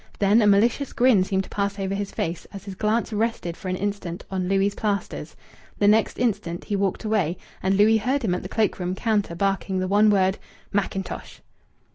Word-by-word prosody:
Then 205 +3 +4
a 210 - +4
malicious 230 +7 +3
grin 240 -6 +4
seemed 190 0 0
to - - -13
pass 200 0 -1
over 195 -1 -2
his 200 0 -3
face 165 +1 -3
as 200 -1 -9
his 195 - -6
glance 215 +4 0
rested 210 -6 -1
for 190 - -9
an 185 - -1
instant 195 -3 -4
on 185 -1 -1
Louis' 195 +1 +2
plasters. 205 -2 -3 0.4
The 205 - +3
next 215 +1 +3
instant 205 -8 -1
he 205 - -2
walked 195 +1 -1
away, 200 -6 0 0.2
and 190 +1 +1
Louis 220 +2 +5
heard 255 +6 0
him 190 -5 +1
at 180 - -2
the - - -7
cloak 215 -3 0
room 180 0 -2
counter 205 -4 0
barking 195 +1 0
the 185 0 -1
one 205 +3 +4
word, 190 -1 +2 0.3
"Mackintosh." 195 -1 -3
200 Hz, 200 wpm, -24 LUFS, 190-215 Hz, 0.4 s, Louis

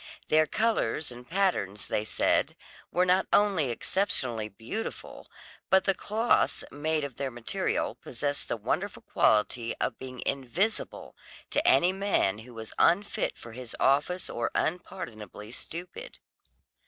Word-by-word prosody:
Their 155 0 +5
colours 160 - 0
and 125 0 -11
patterns, 165 - 0
they 105 - -1
said, 110 - +1 0.4
were 180 - +3
not 185 +1 +3
only 195 -10 +4
exceptionally 120 - 0
beautiful, 115 - -6 0.4
but 190 0 +5
the 195 - +3
clothes 220 +5 +1
made 155 +1 0
of 140 -4 -5
their 140 - -1
material 120 -2 -1
possessed 145 +3 -4
the - - -1
wonderful 105 - -2
quality 115 +2 +2
of - - -1
being 130 -1 -7
invisible 140 - -1 0.4
to 300 +4 +1
any 185 - +5
man 190 - +1
who 120 +2 -12
was 110 -1 -7
unfit 200 +4 +2
for 115 - -10
his 120 0 -8
office 145 +7 +2
or 120 - -1
unpardonably 110 - -3
stupid. 180 - -7
145 Hz, 130 wpm, -29 LUFS, 115-190 Hz, 0.4 s, Their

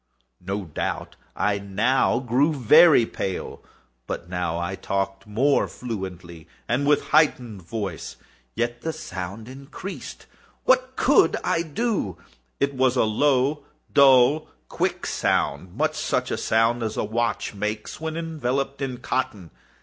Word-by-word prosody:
No 100 +2 -3
doubt 75 - -4 0.2
I 100 +1 0
now 105 +8 +1
grew 130 +5 +1
very 135 +1 +6
pale;—but 85 - -7
I 85 +1 -2
talked 95 +1 -3
more 130 +7 +2
fluently, 90 -8 -7 0.2
and 135 +4 0
with 150 0 +4
a - - -14
heightened 125 -9 +2
voice. 95 -1 -5 0.4
Yet 120 +1 -2
the 160 - -3
sound 100 - -7
increased—and 140 +9 -9 0.4
what - - +2
could - - +4
I 180 -2 +1
do? 170 - -2 0.4
It 140 0 +1
was 130 -1 +2
a - - +3
low, 135 +5 +2 0.3
dull, 140 +1 +6 0.2
quick - - -1
sound—much 85 +6 0
such - - -1
a - - -1
sound 115 +2 +2
as 110 -1 -3
a - - 0
watch 115 +2 -1
makes 105 +6 -4
when 160 0 -3
enveloped 140 -4 -2
in 130 -2 -3
cotton. 105 -9 -3
120 Hz, 125 wpm, -24 LUFS, 100-140 Hz, 0.4 s, very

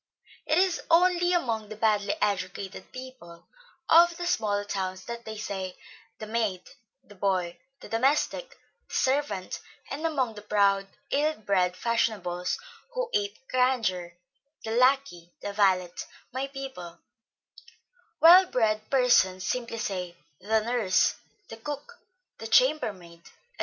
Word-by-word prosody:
It 310 - +2
is 370 -1 +2
only 350 +1 +4
among 230 - 0
the 215 - -7
badly 210 -2 +1
educated 190 -1 -3
people 255 -10 -11 0.4
of 340 +1 +6
the 350 - -4
small 210 -12 0
towns 185 -2 -4
that 235 0 -7
they 220 0 -6
say, 190 -3 -5 0.4
the 215 - -7
'maid,' 215 -4 -2 0.3
the 210 - -16
'boy,' 185 -3 -1 0.2
the - - -10
'domestic,' 280 - 0 0.3
the - - -8
'servant;' 265 -8 0 0.3
and 285 +4 -4
among 275 -8 0
the 210 - -10
proud, 200 -1 +2 0.2
ill 305 +2 +2
bred 185 -3 0
fashionables, 195 - -1 0.4
who - - -2
ape 405 -9 -2
grandeur; 225 -9 +1 0.5
the 220 - -4
'lackey,' 250 -8 +2
the 205 - -4
'valet,' 185 -3 +1 0.3
'my 265 +2 -2
people;' 265 -12 -8 1.2
well 360 +3 +8
bred 215 -5 0
persons 215 -8 +3
simply 235 -2 -2
say, 185 -6 -4 0.2
the 220 +1 +1
'nurse,' 220 -5 +2 0.4
the 225 - -8
'cook,' 295 - -7 0.4
the 225 - -6
'chamber 260 +2 +4
maid,' 170 -3 -16
&c. - - -17
220 Hz, 130 wpm, -27 LUFS, 190-270 Hz, 1.2 s, well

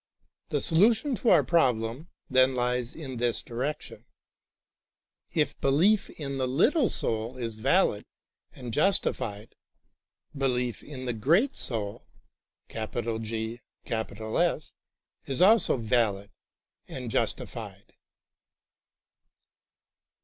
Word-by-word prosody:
The - - 0
solution 220 - +3
of 245 -1 -2
our 170 -9 +6
problem, 125 -2 +1 0.2
then, 130 0 +4
lies 125 0 -1
in 135 -6 -7
this 120 0 -1
direction. 130 +6 -5 1.3
If - - -1
belief 180 +10 +3
in 140 -3 -5
the 130 - 0
little 235 - +3
soul 115 +3 -3
is 115 -2 -4
valid 110 - +2 0.5
and 120 -3 -8
justified, 115 - +1 0.8
belief 125 -3 -1
in 130 -3 -8
the 125 - -1
Great 170 - +2
Soul 105 -4 -5 0.6
is 115 0 -4 1.8
also 210 -4 +5
valid 110 -4 0 0.6
and 125 -3 -6
justified. - - -3
125 Hz, 90 wpm, -28 LUFS, 115-155 Hz, 1.8 s, our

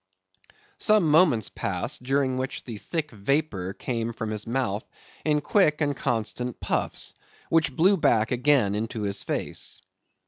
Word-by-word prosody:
Some 215 -5 +4
moments 150 - +4
passed, 90 +3 -3
during 135 0 +1
which 130 0 -4
the 115 -4 -7
thick 155 +2 -3
vapor 105 -4 -1
came 115 -2 -3
from 110 -1 -4
his 105 0 -4
mouth 115 -4 -1 0.4
in 150 -1 +2
quick 150 -1 +3
and 145 -2 +1
constant 125 -1 -2
puffs, - - 0 0.4
which 160 -5 +2
blew 190 +4 +4
back 115 -8 +2
again 125 -5 +3
into 110 +1 -3
his 100 -1 -1
face. - - -3
125 Hz, 140 wpm, -26 LUFS, 110-150 Hz, 0.4 s, Some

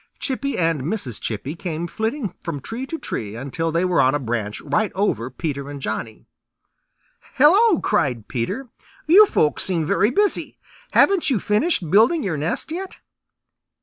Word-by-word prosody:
Chippy 275 0 -2
and 165 -4 +1
Mrs. 140 - -3
Chippy 125 +8 -4
came 170 -1 -4
flitting 220 +7 -2
from 165 -4 -4
tree 235 - -6
to 325 - -4
tree 105 - -5
until 140 +7 -3
they 170 +3 +1
were 180 -1 +3
on 130 +3 +3
a - - 0
branch 110 -4 -3
right 215 -1 0
over 130 - 0
Peter 140 0 -4
and 145 -1 -7
Johnny. 110 -2 -5 1.1
"Hello!" 370 - +5
cried 135 - 0
Peter. 130 - -3 0.4
"You 395 +7 +7
folks 150 - +1
seem 170 -4 0
very 200 +5 +2
busy. 410 +8 0 0.4
Haven't 385 -5 +4
you 250 -6 +1
finished 210 - 0
building 235 - +4
your 180 -5 -1
nest 155 - -3
yet?" 370 +3 -5
170 Hz, 155 wpm, -22 LUFS, -, 1.1 s, You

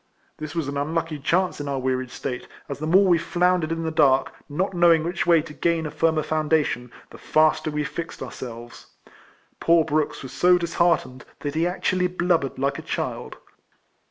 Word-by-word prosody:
This 155 0 -7
was 165 -4 -1
an 140 0 -4
unlucky 160 +1 -2
chance 180 +3 0
in 145 - -5
our 140 -1 -2
wearied 130 -1 -1
state, 125 0 -5 0.2
as 140 - -6
the 155 - -3
more 190 +5 +5
we 175 -3 +4
floundered 175 -1 +1
in 165 0 -2
the 160 - -2
dark, 140 -4 +3 0.2
not 185 +7 -1
know 175 -1 +5
ing 160 -1 +3
which 175 +1 -2
way 165 -3 +5
to 155 -2 -10
gain 165 0 0
a 155 - -4
firmer 160 -1 +1
foundation, 155 -6 0 0.2
the - - -12
faster 155 0 +2
we 150 0 -2
fixed 165 +3 -6
ourselves. 120 -1 -9 0.7
Poor 165 -1 +4
Brooks 155 -2 -1
was 130 - -8
so 180 0 +4
disheartened, 170 -6 0 0.2
that 145 -1 -3
he 165 +2 +1
actually 180 0 0
blub 180 -1 +1
bered 135 - -5
like 135 +1 -1
a - - -6
child. - - -4
155 Hz, 190 wpm, -24 LUFS, 145-170 Hz, 0.7 s, more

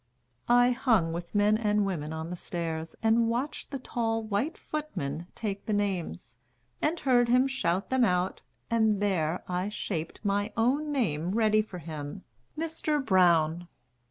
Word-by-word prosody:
I 245 +1 +6
hung 225 -10 +2
with 170 +3 -6
men 210 +1 +4
and 210 -2 +2
women 160 -6 -3
on 160 +1 -5
the - - -3
stairs 165 -2 -4
And 225 +1 +4
watched 250 +6 -3
the 275 - -3
tall 225 -3 -2
white 220 - -1
footman 180 - -4
take 200 -3 -4
the 215 - 0
names, 175 - -3 0.4
And 330 +2 +1
heard 245 -3 +3
him 250 +2 +5
shout 200 -8 -1
them 260 -1 +3
out, 180 -3 +1 0.3
and 220 -3 +3
there 180 -5 0
I 180 +2 -1
shaped 165 -6 -4
My 205 +1 0
own 275 +7 +1
name 180 - 0
ready 215 -1 +4
for 210 -4 -8
him, 155 +1 -7 0.3
"Mr. 315 -1 0
Brown." 175 -3 +3
205 Hz, 155 wpm, -29 LUFS, 170-240 Hz, 0.4 s, I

